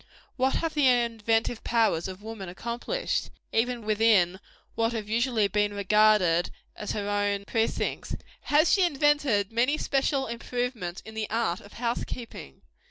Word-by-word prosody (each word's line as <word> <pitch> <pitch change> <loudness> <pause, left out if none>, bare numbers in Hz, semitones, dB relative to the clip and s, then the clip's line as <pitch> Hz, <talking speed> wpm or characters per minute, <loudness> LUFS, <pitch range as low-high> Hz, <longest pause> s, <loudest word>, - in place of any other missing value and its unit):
What 265 +1 +1
have 330 -1 -1
the 295 -3 +3
inventive 230 -2 +1
powers 225 -8 +1
of 190 +2 -9
woman 215 -4 -7
accomplished, 235 - -3 0.2
even 235 0 0
within 210 -4 +3 0.3
what 230 +1 0
have 220 -2 -3
been 215 - -5
usually 235 -3 +2
regarded 205 -3 +3 0.3
as 210 - -4
her 205 -1 -3
own 205 -1 0
precincts? 225 +2 -1 0.3
Has 305 +3 +4
she 395 - +4
invented 290 - +2
many 250 +6 +2
special 275 -1 0
improvements 235 -5 -4
in 220 - -10
the 220 -1 -3
art 220 -6 0
of 205 - -15
house 235 0 -2
keeping? 225 - -9
225 Hz, 145 wpm, -27 LUFS, 205-245 Hz, 0.3 s, Has